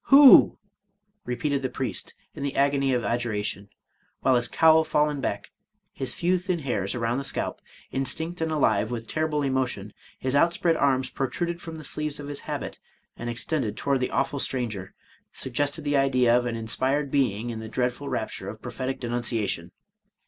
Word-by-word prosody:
— - - -58
Who?'' 275 -1 +9 0.7
repeated 135 +3 -1
the 130 - -1
priest 130 -1 -4 0.2
in - - -8
the 140 0 -2
agony 140 -1 +2
of 125 -2 +1
adjuration, 105 -4 -2 0.5
while 130 - +4
his 120 -1 +2
cowl 160 +3 +5
fallen 150 -2 +1
back, 100 -5 -3 0.4
his 130 - -1
few 180 +1 +2
thin 180 0 -1
hairs 120 - -1
around 120 +1 0
the - - -4
scalp 135 - -3 0.3
instinct 160 +6 -2
and 160 0 0
alive 110 -8 +2
with 115 -2 -5
terrible 155 -2 0
emotion, 130 -7 -1 0.2
his 130 +1 -1
outspread 170 +2 +3
arms 130 -3 +1
protruded 170 +5 -2
from 165 -1 -7
the 155 - -9
sleeves 150 +1 -2
of 145 0 -7
his 145 - -4
habit, - - -4 0.4
and 120 - -5
extended 120 0 -2
toward 140 -1 +1
the 125 - -1
awful 145 -3 0
stranger, 110 -9 -2 0.4
sug 130 - -6
gested 145 +4 0
the 145 -1 +1
idea 130 -3 +4
of 125 0 +2
an 115 - -2
inspired 130 +6 -1
being 120 -4 +1
in 115 - -5
the 110 0 -7
dreadful 125 +4 -2
rapture 110 -6 -3
of 110 +2 -8
prophetic 130 +3 -4
denunciation. 120 -3 -1
130 Hz, 175 wpm, -26 LUFS, 120-145 Hz, 0.7 s, Who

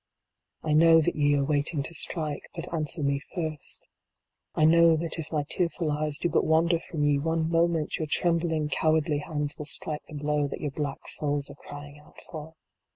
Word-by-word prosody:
I 155 - 0
know 165 +1 +7
that 160 - +1
ye 145 -1 +3
are 140 -1 +1
waiting 145 0 0
to 165 - -7
strike, 155 -2 -2
but 170 +1 -6
answer 155 0 -2
me 140 0 +1 0.2
first 160 -4 -3 0.7
I 155 - +4
know 165 0 +6
that 165 +1 -1
if 160 -1 -6
my 150 -2 0
tearful 170 -2 -1
eyes 150 0 0
do 175 - 0
but - - +2
wander 165 +2 +3
from 155 -2 -4
ye 145 -1 +3
one 160 +2 0
moment, 165 -2 +1
your 155 - -3
trembling 165 -2 +1
cowardly 155 -1 +1
hands 150 -1 -2
will 150 - -5
strike 150 +1 -1
the 155 - -10
blow 150 0 0
that 135 - -6
your 145 - -3
black 145 0 -4
souls 145 -1 -1
are - - -11
crying 145 0 -9
out 150 - -18
for. 160 0 -8
155 Hz, 195 wpm, -27 LUFS, 145-165 Hz, 0.7 s, know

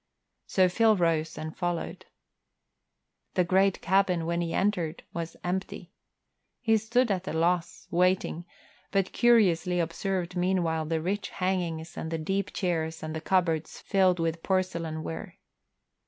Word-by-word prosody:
So 185 -1 +4
Phil 220 +4 +4
rose 165 -2 +1
and 155 0 -6
followed. 175 -2 -3 1.3
The 180 - +4
great 190 +2 +2
cabin, 185 -3 +2
when 170 +1 0
he 170 -1 -2
entered, 175 -4 0
was 170 -1 -5
empty. 180 0 -3 0.7
He 225 -2 +3
stood 220 +2 +1
at 190 -1 -2
loss, 170 +1 0
waiting, 180 -1 +1 0.4
but 195 -2 0
curiously 185 -7 +3
observed 180 +2 -2
meanwhile 175 -3 +1
the 160 0 -1
rich 200 +3 -2
hangings 175 -3 -2
and 160 - -4
the 165 - -2
deep 195 +5 -2
chairs 160 -4 -2
and 155 0 -4
the 160 - -4
cupboards 165 -4 0
filled 190 -3 +3
with 165 0 -1
porcelain 170 -4 -1
ware. 160 - -6
180 Hz, 135 wpm, -28 LUFS, 165-190 Hz, 1.3 s, So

